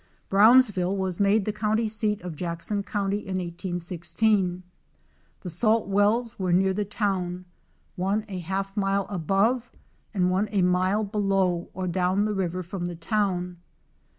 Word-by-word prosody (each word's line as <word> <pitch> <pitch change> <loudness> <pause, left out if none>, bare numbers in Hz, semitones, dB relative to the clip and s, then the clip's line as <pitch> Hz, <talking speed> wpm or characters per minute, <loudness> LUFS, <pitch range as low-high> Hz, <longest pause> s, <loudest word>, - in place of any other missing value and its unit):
Brownsville 205 -3 +5
was 190 -2 -2
made 200 0 +3
the 215 - -1
county 215 +1 0
seat 210 -1 -1
of 175 -3 -6
Jackson 175 +5 -2
county 200 0 -2
in 190 -2 -4
1816. 180 +2 -1 0.8
The 180 - -6
salt 220 +6 +2
wells 210 +4 +1
were 185 -2 0
near 190 +2 +3
the 205 +2 -1
town, 185 -3 -2 0.5
one 200 +3 -1
a 190 -3 -5
half 195 +3 -3
mile 195 -1 +1
above, 200 +7 +1 0.4
and 180 -4 +1
one 195 +3 0
a 200 -3 +2
mile 185 +4 +2
below 195 -4 0
or 185 0 -3
down 185 +3 +1
the 215 - -1
river 185 -2 -2
from 175 0 -5
the 175 0 -4
town. 180 -1 -1
195 Hz, 150 wpm, -26 LUFS, 180-210 Hz, 0.8 s, Brownsville